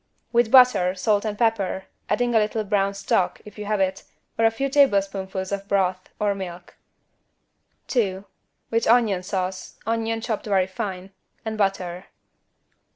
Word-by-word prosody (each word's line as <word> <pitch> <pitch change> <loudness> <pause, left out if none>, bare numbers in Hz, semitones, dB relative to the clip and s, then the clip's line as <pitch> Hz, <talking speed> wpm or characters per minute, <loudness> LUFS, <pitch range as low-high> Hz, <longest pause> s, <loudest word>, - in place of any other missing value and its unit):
With 235 -1 +3
butter, 220 -8 +6
salt 205 +2 +1
and 210 -1 -3
pepper, 205 -5 0 0.2
adding 240 +3 +1
a 225 - +5
little 215 +1 0
brown 200 -1 0
stock, 195 -2 0
if 210 0 -12
you 210 - -5
have 210 0 0
it, 190 0 0 0.3
or 225 - +2
a - - +7
few 225 +5 -2
tablespoonfuls 195 -8 +1
of 200 0 -3
broth, 185 -2 0
or 205 -1 +2
milk. 180 -2 -8 1.1
2. 200 -6 -1 0.5
With 230 0 +1
onion 225 -6 +4
sauce 185 0 -4
(onion 225 0 -1
chopped 225 -2 -3
very 195 -3 +3
fine) 190 0 -5 0.3
and 220 0 -3
butter. 190 -3 -1
200 Hz, 150 wpm, -24 LUFS, 190-225 Hz, 1.1 s, a